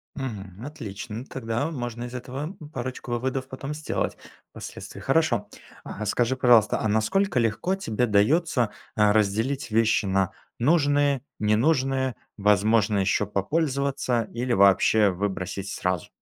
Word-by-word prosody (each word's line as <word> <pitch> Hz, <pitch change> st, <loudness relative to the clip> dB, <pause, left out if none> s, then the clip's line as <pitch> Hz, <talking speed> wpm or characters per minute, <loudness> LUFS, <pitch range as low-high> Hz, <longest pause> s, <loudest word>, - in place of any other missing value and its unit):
Мгм, 105 Hz, -5 st, -6 dB
отлично. 115 Hz, -3 st, -7 dB
Тогда 125 Hz, +2 st, -3 dB
можно 120 Hz, -5 st, -5 dB
из 120 Hz, -, -8 dB
этого, 135 Hz, +8 st, -5 dB
м, 150 Hz, -, -10 dB
парочку 130 Hz, -2 st, -5 dB
выводов 130 Hz, +2 st, -2 dB
потом 135 Hz, +2 st, -6 dB
сделать 150 Hz, 0 st, -3 dB, 0.3 s
впоследствии. -, -, -9 dB
Хорошо, -, -, +1 dB, 0.4 s
а 105 Hz, -, -6 dB
скажи, 120 Hz, +5 st, +1 dB
пожалуйста, 120 Hz, -4 st, +4 dB
а 110 Hz, -, 0 dB
насколько 125 Hz, -, +1 dB
легко 115 Hz, -, 0 dB
тебе 125 Hz, -, -1 dB
дается, 120 Hz, +3 st, +2 dB, 0.2 s
э, 105 Hz, -1 st, +4 dB
разделить 110 Hz, +7 st, 0 dB
вещи 110 Hz, -1 st, +3 dB
на 95 Hz, -1 st, +1 dB, 0.3 s
нужные, 145 Hz, -1 st, +3 dB, 0.2 s
ненужные, 130 Hz, +3 st, +1 dB, 0.2 s
возможно 105 Hz, +1 st, +3 dB
еще 100 Hz, +1 st, +1 dB
попользоваться 135 Hz, -, 0 dB
или 120 Hz, +1 st, -1 dB
вообще 100 Hz, +1 st, +5 dB
выбросить 95 Hz, 0 st, -3 dB
сразу? 90 Hz, -3 st, -2 dB
120 Hz, 125 wpm, -25 LUFS, 105-135 Hz, 0.4 s, вообще